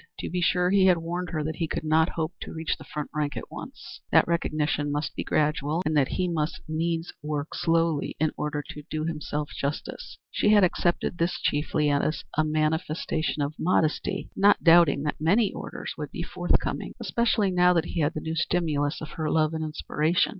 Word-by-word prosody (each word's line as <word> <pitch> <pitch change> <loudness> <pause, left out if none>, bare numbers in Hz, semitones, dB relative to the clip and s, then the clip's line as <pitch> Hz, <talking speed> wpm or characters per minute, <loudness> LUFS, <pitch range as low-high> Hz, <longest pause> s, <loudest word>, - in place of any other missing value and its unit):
To - - -5
be 180 0 -1
sure 180 +1 +2
he 195 -1 +5
had 180 -2 +5
warned 175 +2 -3
her 155 -3 -2
that 160 +1 -3
he 165 - -1
could - - -3
not 160 +2 +3
hope 160 +1 -1
to - - -6
reach 160 0 -2
the - - -12
front 150 -1 -6
rank 150 -1 -2
at - - -7
once; - - -9
that - - +5
recognition 150 -3 0
must 145 +1 -2
be - - -2
gradual; 150 +2 0
and 155 +1 +1
that 140 -3 +4
he 180 - -1
must 160 -2 -1
needs 165 +1 -2
work 150 0 -3
slowly 165 -3 +1
in 155 -1 +2
order 150 0 -3
to 150 - -7
do 155 0 -2
himself 150 -2 -3
justice. 140 +2 -4
She - - +2
had 210 -2 +6
accepted 175 -1 +1
this 170 +1 0
chiefly 150 0 +1
as 145 +2 0
a 155 - +3
manifestation 155 0 -1
of 145 +2 -2
modesty, 160 -3 0
not 205 +1 +4
doubting 165 -4 +6
that 150 0 -3
many 200 +7 +3
orders - - -6
would - - -4
be - - -5
forthcoming, - - -1
especially 225 -4 +1
now 180 0 +5
that 165 -2 +1
he 170 - -4
had 155 +2 +1
the 155 - -3
new 160 +1 -3
stimulus 160 -3 0
of 155 - -6
her 155 -1 -3
love 155 0 +2
and 160 0 -2
inspiration. 155 +3 0
160 Hz, 200 wpm, -26 LUFS, 150-170 Hz, -, had